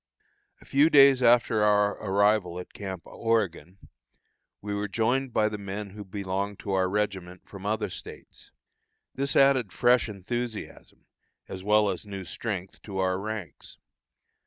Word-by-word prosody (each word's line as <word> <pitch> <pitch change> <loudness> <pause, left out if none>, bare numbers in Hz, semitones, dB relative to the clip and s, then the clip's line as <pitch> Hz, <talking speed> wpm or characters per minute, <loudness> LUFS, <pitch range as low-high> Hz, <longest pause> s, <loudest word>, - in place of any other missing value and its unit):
A - - -17
few 145 +4 +4
days 140 -3 +7
after 120 -2 +4
our 105 -1 +4
arrival 100 -3 +2
at 90 - -10
Camp 95 -4 -6
Oregon, 95 -6 -2 0.8
we 105 0 -5
were 100 0 -2
joined 120 +6 0
by 110 -1 +2
the 105 -1 -5
men 100 0 -6
who 105 +1 -8
belonged 100 +1 -4
to 100 - -5
our 95 -1 +1
regiment 95 -3 -3
from 100 0 -8
other 105 0 0
States. - - -11 0.6
This 140 +1 -2
added 135 -7 +4
fresh 120 +1 +3
enthusiasm, 110 +3 -6 0.4
as 95 -1 -8
well 105 +1 +4
as 90 - -5
new 100 -2 -6
strength, 95 -2 -5
to 100 -3 -7
our 95 0 0
ranks. 105 -3 -7
105 Hz, 145 wpm, -27 LUFS, 95-115 Hz, 0.8 s, days